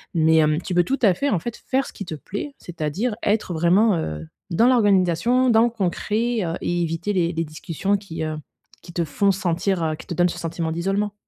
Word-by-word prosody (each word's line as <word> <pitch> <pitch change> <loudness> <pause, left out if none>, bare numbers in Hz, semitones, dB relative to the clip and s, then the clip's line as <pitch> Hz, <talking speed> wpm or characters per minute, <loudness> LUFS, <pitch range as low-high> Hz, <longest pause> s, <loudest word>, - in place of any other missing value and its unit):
mais 160 0 +4
hem, 155 0 +3
tu 180 - -4
peux 175 - +5
tout 270 +10 -1
à 200 -5 +6
fait, 285 +10 0
en 195 - +2
fait, 235 +7 -5
faire 270 +1 -1
ce - - -10
qui - - -6
te 165 - -5
plaît. 205 - -6
C'est-à-dire 175 +7 -3
être 205 -3 0
vraiment, 180 +6 +3
heu, 80 - -4 0.2
dans 225 +8 +4
l'organisation, 225 +1 +3
dans 225 0 +5
le 240 - +3
concret, 225 +3 -1
heu 165 - -2
et 175 0 -1
éviter 165 +5 -2
les 175 -3 +1
les 165 0 -1
discussions 165 +5 -2
qui, 170 -5 -6
heu, 155 0 -2 0.5
qui 175 - -12
te 170 -1 0
font 200 +6 +2
sentir, 185 -1 -1
heu, 155 -1 0
qui - - -13
te 170 - -4
donnent 175 +1 +3
ce - - -6
sentiment 165 0 -3
d'isolement. 195 +5 -1
180 Hz, 225 wpm, -23 LUFS, 165-210 Hz, 0.5 s, à